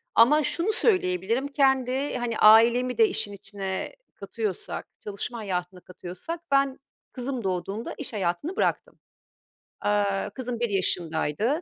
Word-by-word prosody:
ama 295 +7 +6
şunu 350 +9 +1
söyleyebilirim; 235 - +1
kendi, 270 -1 +1
hani, 235 -2 -2
ailemi 235 +4 +6
de 445 - +6
işin 205 - -2
içine 195 - -5 0.2
katıyorsak, 205 -1 -4 0.2
çalışma 210 +4 -5
hayatını 180 -3 -4
katıyorsak 185 - -7
ben 275 -1 +2 0.3
kızım 255 -2 -4
doğduğunda 195 +4 -3
iş - - -7
hayatını 200 - -2
bıraktım. - - -1 0.8
Aaa, 205 -1 +1
kızım 245 +1 -5
1 240 -2 0
yaşındaydı. 185 - 0
225 Hz, 120 wpm, -26 LUFS, 195-265 Hz, 0.8 s, ama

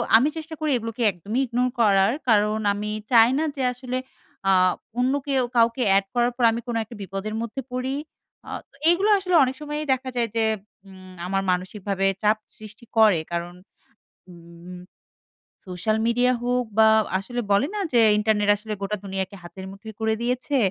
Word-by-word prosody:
আমি 240 +5 +6
চেষ্টা 320 0 -6
করি 310 -2 0
এগুলোকে 230 +1 -6
একদমই 205 +8 -3
ইগনোর 250 +1 0
করার। 200 -2 +4 0.2
কারণ 215 0 +3
আমি 210 +1 -4 0.2
চাই 230 -1 +7
না - - +1
যে 270 - -2
আসলে 255 0 -4 0.5
আ - - +6 0.5
অন্য 255 +2 +2
কেউ 270 -2 +2
কাউকে 230 +2 +3
এড 195 - +1
করার 240 0 +2
পর 245 - -1
আমি 230 +1 -3
কোন 240 - -3
একটা 225 +2 -12
বিপদের 195 +3 -5
মধ্যে 235 +4 -4
পড়ি। 255 +2 -2 0.5
আ - - -8 0.4
এগুলো 380 +5 +3
আসলে 365 -2 0
অনেক 260 0 -1
সময়ই 300 +1 -4
দেখা 260 0 -4
যায় 235 -1 0
যে 225 - +2 0.4
উম 185 -1 -13
আমার 195 +1 0
মানসিকভাবে 195 +2 -2 0.2
চাপ 215 +1 +3 0.2
সৃষ্টি 215 +3 -12
করে। 215 -6 +6
কারণ, 170 +1 -3 0.8
উম 170 +1 -12 0.9
সোশ্যাল 200 +5 -1
মিডিয়া 245 +2 +3
হোক 250 0 0
বা, 220 0 +7 0.3
আসলে 240 +5 -4
বলে 200 +7 +3
না? - - -2
যে 240 - +5 0.2
ইন্টারনেট 210 -1 +1
আসলে 215 +1 -6
গোটা 210 +1 -2
দুনিয়াকে 190 0 -4
হাতের 190 +2 -9
মুঠোয় 220 +3 -10
করে 220 0 +1
দিয়েছে। 250 +4 -1
220 Hz, 170 wpm, -24 LUFS, 195-250 Hz, 0.9 s, চাই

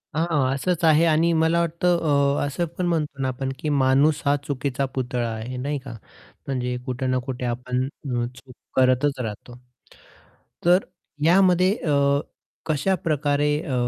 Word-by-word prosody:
हां, 150 -5 +1
असंच 170 +5 -1
आहे 160 0 +5
आणि 165 +1 +3
मला 165 +1 +3
वाटतं 170 +1 +1 0.4
अ, - - 0
असं 145 +5 -2
पण 180 - -1
म्हणतो 150 -5 -1
ना 130 - 0
आपण 130 +1 -3
की 155 - -2
माणूस 140 +2 +3
हा 140 0 +4
चुकीचा 140 -1 -1
पुतळा 125 -2 -2
आहे 115 +3 -6
नाही 145 +3 -2
का? 130 -2 -9 0.5
म्हणजे 125 -2 -2
कुठे 130 +1 -3
ना 130 0 +1
कुठे 130 -2 -4
आपण 125 +1 -2
अ, 140 +1 -9 0.3
चूक 130 -1 -15 0.2
करतच 130 +2 +2
राहतो. 120 +1 -6 1.1
तर 180 +3 +4 0.4
यामध्ये 185 +1 +4
अ, 150 -8 -1 0.7
कशा 160 +5 +1
प्रकारे 145 -1 +1
अ, 150 -5 -5
140 Hz, 150 wpm, -23 LUFS, 130-160 Hz, 1.1 s, आहे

